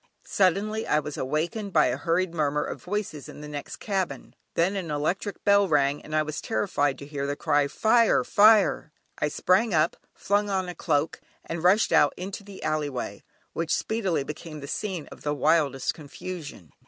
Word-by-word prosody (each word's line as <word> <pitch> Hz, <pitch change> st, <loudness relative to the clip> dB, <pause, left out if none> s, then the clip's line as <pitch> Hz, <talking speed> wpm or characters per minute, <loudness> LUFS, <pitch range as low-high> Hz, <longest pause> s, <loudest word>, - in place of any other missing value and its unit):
Suddenly 205 Hz, +4 st, +1 dB
I -, -, +3 dB
was 150 Hz, -1 st, -3 dB
awakened 175 Hz, -, -2 dB
by -, -, +5 dB
a -, -, +1 dB
hurried 170 Hz, +1 st, 0 dB
murmur 150 Hz, -2 st, 0 dB
of -, -, -6 dB
voices 185 Hz, -7 st, -4 dB
in -, -, -10 dB
the 150 Hz, -, -7 dB
next 145 Hz, -1 st, -6 dB
cabin, 195 Hz, -4 st, -3 dB, 0.2 s
then 180 Hz, +4 st, +2 dB
an 185 Hz, -4 st, -3 dB
electric 155 Hz, +7 st, -2 dB
bell 200 Hz, -1 st, +5 dB
rang 145 Hz, -3 st, +2 dB
and 155 Hz, -, -6 dB
I 155 Hz, -, +3 dB
was 155 Hz, 0 st, -5 dB
terrified 145 Hz, -, 0 dB
to 140 Hz, -, -9 dB
hear 140 Hz, -1 st, -4 dB
the 145 Hz, -, -1 dB
cry: 145 Hz, -1 st, +2 dB
"Fire! 230 Hz, -, +3 dB
Fire!" 215 Hz, -8 st, +4 dB, 0.3 s
I -, -, +1 dB
sprang 185 Hz, +6 st, +2 dB
up, 155 Hz, +2 st, +2 dB, 0.2 s
flung 205 Hz, +1 st, 0 dB
on 190 Hz, -2 st, 0 dB
a 180 Hz, -, -5 dB
cloak, 155 Hz, -2 st, -1 dB, 0.2 s
and 165 Hz, 0 st, -5 dB
rushed 190 Hz, +5 st, +4 dB
out 145 Hz, -, +4 dB
into 195 Hz, +3 st, -6 dB
the 200 Hz, -1 st, -11 dB
"Alley 155 Hz, -1 st, 0 dB
Way," 130 Hz, -3 st, -5 dB, 0.3 s
which 165 Hz, 0 st, 0 dB
speedily 195 Hz, -10 st, -1 dB
became 155 Hz, +2 st, -7 dB
the 140 Hz, -, -7 dB
scene 185 Hz, -2 st, -3 dB
of -, -, -12 dB
the 145 Hz, 0 st, -1 dB
wildest 145 Hz, -3 st, +2 dB
confusion. 150 Hz, -, -8 dB
165 Hz, 185 wpm, -26 LUFS, 150-200 Hz, 0.3 s, by